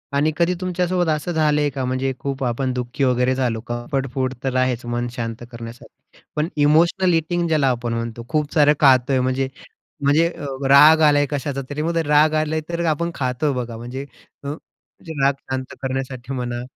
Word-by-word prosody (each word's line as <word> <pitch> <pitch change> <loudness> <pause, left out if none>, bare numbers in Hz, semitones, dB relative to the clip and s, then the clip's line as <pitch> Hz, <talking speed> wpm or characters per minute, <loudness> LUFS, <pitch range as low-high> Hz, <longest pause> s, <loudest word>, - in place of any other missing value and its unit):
आणि 150 +2 +2
कधी 170 +1 +2
तुमच्यासोबत 180 -1 0
असं 155 +3 -1
झालंय 150 -2 +2
का? 135 -1 -4
म्हणजे 130 +1 -1
खूप 135 -1 -4
आपण 130 +1 -1
दुःखी 125 +2 -3
वगैरे 125 0 +2
झालो, 120 -4 -1
क - - -30
कम्फर्ट 130 +3 -2
फूड 130 -1 -1
तर 135 -1 -1
आहेच 130 -1 0
मन 120 0 -2
शांत 115 -1 -5
करण्यासाठी 115 0 -12 0.2
पण 150 +2 0
इमोशनल 170 +5 +3
ईटिंग 170 +1 0
ज्याला 155 -4 +2
आपण 120 -1 -2
म्हणतो, 115 0 -4
खूप 150 -2 -1
सारं 150 -1 +5
खातोय 130 -1 +4
म्हणजे 130 +1 0 0.6
म्हणजे 150 +4 +4
अ, 145 - -8 0.2
राग 150 +3 +8
आलाय 145 -2 +5
कशाचा 140 -1 -2
तरी, 145 +1 -3
मग 165 +2 -1
राग 150 +1 +4
आला 155 0 0
तर 170 0 -2
आपण 170 +2 0
खातो 130 +2 -1
बघा, 120 -3 -4
म्हणजे 125 +4 -6 0.4
अ, 140 - -6 0.6
राग 140 -2 +2 0.2
शांत 130 0 -4
करण्यासाठी 130 -1 -4
म्हणा. 120 -1 -3
135 Hz, 175 wpm, -21 LUFS, 125-155 Hz, 0.6 s, राग